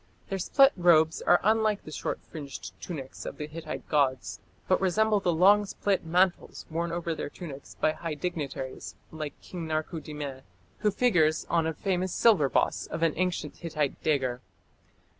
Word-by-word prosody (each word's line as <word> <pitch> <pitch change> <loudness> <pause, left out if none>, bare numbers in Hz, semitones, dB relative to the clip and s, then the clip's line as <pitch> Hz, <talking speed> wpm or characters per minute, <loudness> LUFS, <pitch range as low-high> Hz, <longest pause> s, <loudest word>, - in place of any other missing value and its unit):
Their 195 -1 -2
split 270 +9 +5
robes 165 -3 +4
are 175 - +5
unlike 215 0 +2
the 155 - -9
short - - -3
fringed 140 - -8
tunics 135 - -7
of - - -6
the 150 - -4
Hittite 155 +1 -7
gods, 135 -4 +1 0.3
but 185 - +3
resemble 210 +3 +3
the 180 -3 +1
long 195 +5 +5
split 200 -1 0
mantles 175 +2 +1
worn 170 +1 -1
over 170 -1 -2
their 155 - -4
tunics 145 -5 -9
by 155 - +2
high 160 0 -5
dignitaries 145 -5 -5 0.2
like 155 -2 -6
King 170 -3 -6
Tarku 155 +1 -2
dimme, 145 -4 -6 0.4
who 210 - +2
figures 175 -9 +2
on 165 -1 +2
a 160 - -1
famous 185 0 -1
silver 185 -12 +5
boss - - +1
of 165 - -3
an 165 -2 +3
ancient 180 +1 -2
Hittite 155 -4 -2
dagger. 130 -5 0
165 Hz, 165 wpm, -28 LUFS, 150-185 Hz, 0.4 s, split